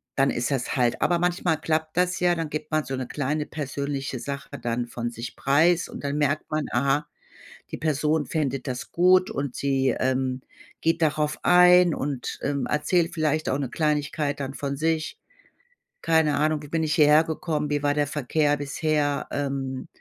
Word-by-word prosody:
dann 135 0 +3
ist 120 +4 -1
das 135 -3 -1
halt 125 -2 +1
Aber 175 - +3
manchmal 175 -2 0
klappt 155 +1 -2
das 180 0 +1
ja. 175 -1 +3
Dann 165 -2 -3
gibt 155 0 -4
man 155 -1 0
so 135 - -3
'ne 130 -1 -4
kleine 150 +1 -2
persönliche 140 -3 -4
Sache 140 +1 -6
dann 120 0 -1
von 120 0 -4
sich 115 0 -7
preis 160 +6 +2
und - - -9
dann 140 +1 -2
merkt 145 +1 0
man, 155 -1 0
aha, 140 +4 +1 0.6
die - - -4
Person 155 0 0
findet 140 -4 -2
das 125 -1 -5
gut 185 +1 +4
und 140 -2 -3
sie, 135 -1 +1
ähm, 130 0 0 0.4
geht 165 +1 +1
darauf 150 -1 +1
ein 180 -1 +6
und, 135 -2 -4
ähm, 140 -2 -1
erzählt 165 +3 +1
vielleicht 155 -1 0
auch 135 - +1
'ne 135 -4 -3
Kleinigkeit 150 -1 -1
dann 135 0 -4
von 140 -1 -3
sich. 160 +2 -1 0.9
Keine 160 -2 +3
Ahnung, 155 0 +1
wie 150 - -10
bin 160 +2 -1
ich 155 - 0
hierhergekommen? 155 0 +2
Wie 145 -1 0
war 145 0 +1
der 145 - +2
Verkehr 145 +1 0
bisher? 145 0 -1
Ähm, 135 -2 -3
150 Hz, 175 wpm, -25 LUFS, 140-160 Hz, 0.9 s, ein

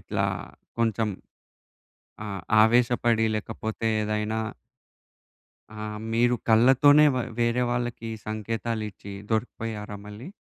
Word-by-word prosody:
ఇట్లా - - -2 0.5
కొంచెం 110 -1 +1 1.2
ఆహ్, 100 -3 -5 0.2
ఆవేశపడి 120 0 +3
లేకపోతే 110 +1 -3
ఏదైనా 105 +1 -1 1.4
ఆ! - - -10 0.4
మీరు 120 +2 +3
కళ్ళతోనే 135 +6 +6
వ - - -2 0.2
వేరే 120 +1 +2
వాళ్ళకి 120 -2 -3 0.2
సంకేతాలిచ్చీ 110 -2 -4 0.2
దొరికిపోయారా 110 -2 -3
మళ్ళీ? 105 +9 -9
115 Hz, 85 wpm, -26 LUFS, 110-120 Hz, 1.4 s, కళ్ళతోనే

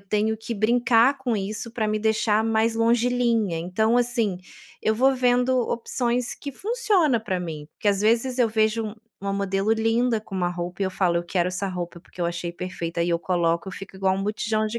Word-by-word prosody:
tenho 210 +2 0
que 225 +1 -5
brincar 235 +4 +4
com 245 -4 -1
isso 210 +4 -4
pra 225 -2 -1
me 215 0 0
deixar 220 0 +2
mais 225 0 +2
longilínea 230 -5 +2
então, 220 +7 +1
assim, 235 -6 +1 0.4
eu 220 - +2
vou 265 +4 +3
vendo 250 0 +2
opções 240 +1 -1
que 285 - -7
funciona 390 - +1
pra 195 -4 -2
mim, 155 -4 -6
porque - - -6
às 200 -1 +2
vezes 235 +4 +2
eu 235 - +4
vejo 220 0 0 0.3
uma 200 0 -2
modelo 195 +1 0
linda 225 +1 +1
com 205 -2 -11
uma 180 -2 0
roupa 175 +2 -4
e - - +2
eu - - -2
falo: 185 -2 +1
"Eu 170 - -1
quero 175 0 0
essa 185 +2 -3
roupa 175 -2 -5
porque 180 - -14
eu 170 - +1
achei 170 0 -3
perfeita", 170 -1 -4
e 175 - -1
eu 170 - +2
coloco 170 0 0
eu - - -7
fico 195 0 -9
igual 190 0 +1
botijão 215 +1 -1
de 230 +2 -3
215 Hz, 205 wpm, -24 LUFS, 185-235 Hz, 0.4 s, brincar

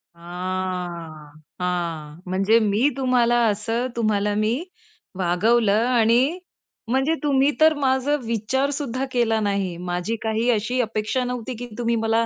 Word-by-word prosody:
हां 175 -3 -5 0.3
हां, 170 -4 -3
म्हणजे 195 +5 +3
मी 215 +6 +2
तुम्हाला 245 -2 +2
असं, 225 +4 -1
तुम्हाला 210 -2 +1
मी 215 +2 +1 0.7
वागवलं 210 +5 +2
आणि 245 +7 +3 0.5
म्हणजे 265 +6 +2
तुम्ही 280 0 +3
तर 315 0 +7
माझा 265 +2 +2
विचारसुद्धा 265 +4 -1
केला 230 -3 +1
नाही, 200 -4 -1
माझी 180 +5 -3
काही 220 +2 0
अशी 230 +4 0
अपेक्षा 225 +3 -1
नव्हती, 250 0 -4
की 245 +2 -7
तुम्ही 235 -1 0
मला 225 +1 +1
225 Hz, 120 wpm, -23 LUFS, 185-250 Hz, 0.7 s, तर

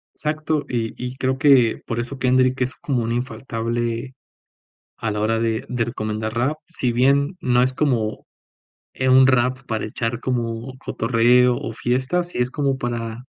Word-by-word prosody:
Exacto, 155 0 -1
y 115 -2 -2
y 125 +1 -5
creo 130 0 -1
que 130 -6 +4
por 115 0 -2
eso 130 +3 -4
Kendrick 130 0 +2
es 125 - -1
como 135 -8 -2
un 115 - -1
infaltable 120 0 -3 0.8
a 110 - -2
la 105 - -2
hora 110 +1 +1
de 115 -1 -1
de 120 -2 -1
recomendar 110 -2 -3
rap, 130 +6 0
si 135 -8 +1
bien 140 +7 +3
no 125 -1 +3
es 130 +1 +2
como, 120 -7 -1 0.7
eh, 130 0 0
un 130 +1 +7
rap 130 0 +2
para 110 -3 -2
echar 115 +2 -3
como 120 0 -3
cotorreo 125 +1 +3
o 115 - -5
fiestas 130 +10 -1
sí - - -6
es 125 +1 0
como 140 -2 0
para 120 -1 -4
125 Hz, 165 wpm, -22 LUFS, 115-130 Hz, 0.8 s, un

